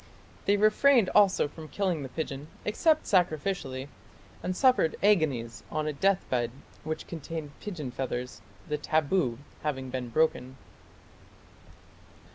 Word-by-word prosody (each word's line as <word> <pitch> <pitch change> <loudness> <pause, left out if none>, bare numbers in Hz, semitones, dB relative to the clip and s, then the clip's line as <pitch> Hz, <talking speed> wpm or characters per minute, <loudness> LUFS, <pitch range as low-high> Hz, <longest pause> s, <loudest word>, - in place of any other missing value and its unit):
They 200 +1 +4
refrained 215 +2 +5
also 200 -6 +5
from 155 +2 -10
killing 185 -3 -1
the 135 - -6
pigeon 145 0 -5 0.2
except 310 +9 +3
sacrificially, 155 -7 0 0.5
and 185 0 -3
suffered 255 -11 +4
agonies 145 - +2
on 155 0 -2
a 155 - -1
deathbed 135 -8 +1 0.3
which 155 +1 -4
contained 160 -2 -6
pigeon 160 -11 -5
feathers, 125 -1 -4 0.3
the 150 -1 -2
"taboo" 150 -4 +1 0.2
having 135 -4 -3
been 125 -1 -3
broken. 130 -2 0
155 Hz, 115 wpm, -29 LUFS, 135-195 Hz, 0.5 s, refrained